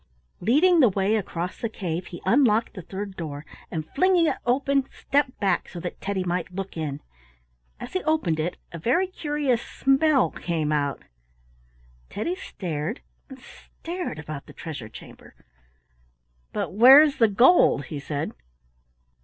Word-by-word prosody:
Leading 330 - +4
the 255 -6 +6
way 195 +2 +1
across 180 -4 -4
the 230 - -1
cave, 175 -4 -4
he 175 - -10
unlocked 230 0 +3
the 190 - -7
third 195 +3 -7
door, 150 -3 -6 0.2
and 160 -2 -4
flinging 360 +2 +3
it - - 0
open 275 +2 +1
stepped 280 -2 -1
back 200 -2 0
so 175 - -8
that 175 +1 -7
Teddy 195 -1 -2
might 180 -1 -2
look 195 +1 -6
in. 150 -4 -4 0.8
As 245 - -8
he 370 - 0
opened 305 - +1
it 170 +3 -2
a 170 - -7
very 260 - +2
curious 295 -9 -1
smell 270 0 +2
came 160 -3 -2
out. 145 -2 -1 1.1
Teddy 335 - -3
stared 180 - -5 0.3
and 265 -1 -11
stared 340 - -7
about 150 -1 -7
the - - -12
treasure 145 -9 -7
chamber. - - -14 1.2
"But - - -3
where 260 +8 +9
is 295 -3 -1
the 225 - +6
gold?" 215 - +4
he 145 - -6
said. 145 +1 -4
205 Hz, 150 wpm, -25 LUFS, 165-275 Hz, 1.2 s, where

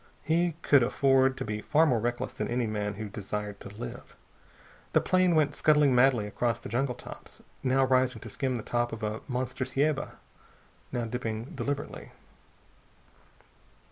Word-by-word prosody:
He 170 +1 +1
could 140 -2 +6
afford 135 +1 +3
to - - -3
be 105 0 -3
far 155 +6 +3
more 125 -7 +2
reckless 120 +2 -2
than - - -3
any 120 0 0
man 105 -1 -2
who 110 +1 -5
desired 105 0 -5
to - - -9
live. 105 +4 -8 0.8
The - - +6
plane 185 -2 +3
went 150 -2 +3
scuttling 150 -3 +4
madly 125 -3 +4
across 115 +3 -1
the - - -8
jungle 125 +3 0
tops, - - -11 0.2
now 135 +1 +3
rising 130 -2 +2
to - - -8
skim 130 -3 -1
the 115 - -4
top 120 0 -1
of 115 0 -6
a 105 +1 -2
monster 130 0 -2
ceiba, 135 +3 0 0.8
now 120 -2 -1
dipping 115 0 -4
deliberately. 145 0 -4
125 Hz, 160 wpm, -29 LUFS, 110-135 Hz, 0.8 s, could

